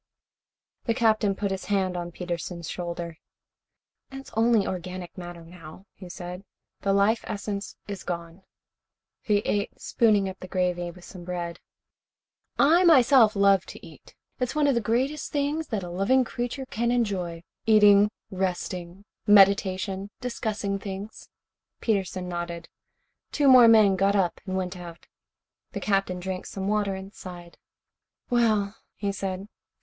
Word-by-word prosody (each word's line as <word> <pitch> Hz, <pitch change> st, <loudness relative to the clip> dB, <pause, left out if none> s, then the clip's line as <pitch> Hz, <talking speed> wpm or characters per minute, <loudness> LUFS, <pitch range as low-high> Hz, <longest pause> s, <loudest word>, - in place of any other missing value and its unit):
The 230 Hz, -, +1 dB
Captain 215 Hz, -3 st, +2 dB
put 200 Hz, 0 st, -2 dB
his 190 Hz, -1 st, -4 dB
hand 190 Hz, -3 st, 0 dB
on 175 Hz, 0 st, -4 dB
Peterson's 170 Hz, -1 st, -5 dB
shoulder. 170 Hz, -2 st, -5 dB, 0.9 s
"It 270 Hz, -, -7 dB
is -, -, -15 dB
only 225 Hz, -2 st, +3 dB
organic 180 Hz, -1 st, -5 dB
matter, 175 Hz, -2 st, -9 dB
now," 165 Hz, +1 st, -13 dB
he 185 Hz, -2 st, -11 dB
said. 180 Hz, +1 st, -7 dB, 0.4 s
"The 200 Hz, -, 0 dB
life 200 Hz, +3 st, +3 dB
essence 200 Hz, 0 st, -4 dB
is 200 Hz, -2 st, -5 dB
gone." 170 Hz, +1 st, -6 dB, 0.8 s
He 205 Hz, -1 st, +1 dB
ate, 205 Hz, -1 st, -1 dB
spooning 210 Hz, -4 st, +2 dB
up 190 Hz, 0 st, -7 dB
the 185 Hz, -, -8 dB
gravy 180 Hz, -1 st, -1 dB
with 175 Hz, +1 st, -13 dB
some 180 Hz, -2 st, -10 dB
bread. 175 Hz, -1 st, -5 dB, 1.0 s
"I, 330 Hz, +6 st, +5 dB
myself, 260 Hz, -, +6 dB
love 200 Hz, -1 st, +4 dB
to -, -, -10 dB
eat. -, -, -16 dB, 0.2 s
It -, -, 0 dB
is 250 Hz, -, -7 dB
one 300 Hz, -1 st, +3 dB
of 280 Hz, -, +4 dB
the 235 Hz, -, +1 dB
greatest 260 Hz, +7 st, -1 dB
things 295 Hz, +2 st, -1 dB
that 210 Hz, -5 st, -3 dB
a 175 Hz, -, -6 dB
living 200 Hz, +9 st, +3 dB
creature 245 Hz, +2 st, -4 dB
can 235 Hz, -1 st, -1 dB
enjoy. 190 Hz, -8 st, -1 dB, 0.2 s
Eating, 210 Hz, -1 st, +6 dB, 0.2 s
resting, 185 Hz, 0 st, -3 dB, 0.2 s
meditation, 195 Hz, -1 st, +4 dB
discussing 215 Hz, -5 st, -3 dB
things." 200 Hz, +2 st, -8 dB, 0.5 s
Peterson 190 Hz, -4 st, -1 dB
nodded. 175 Hz, -1 st, -5 dB, 0.6 s
Two 290 Hz, -1 st, +2 dB
more 255 Hz, -3 st, +9 dB
men 215 Hz, -4 st, +6 dB
got 195 Hz, +2 st, +2 dB
up 185 Hz, -3 st, 0 dB
and 190 Hz, 0 st, -2 dB
went 185 Hz, 0 st, -3 dB
out. 175 Hz, -2 st, -10 dB, 0.7 s
The -, -, -3 dB
Captain 195 Hz, -3 st, 0 dB
drank 185 Hz, 0 st, -5 dB
some 195 Hz, 0 st, -5 dB
water 205 Hz, -2 st, 0 dB
and 190 Hz, +1 st, -9 dB
sighed. 175 Hz, -2 st, -11 dB, 0.7 s
"Well," 215 Hz, -4 st, +2 dB, 0.2 s
he 200 Hz, -1 st, -2 dB
said. 195 Hz, 0 st, -4 dB
195 Hz, 145 wpm, -26 LUFS, 180-220 Hz, 1.0 s, more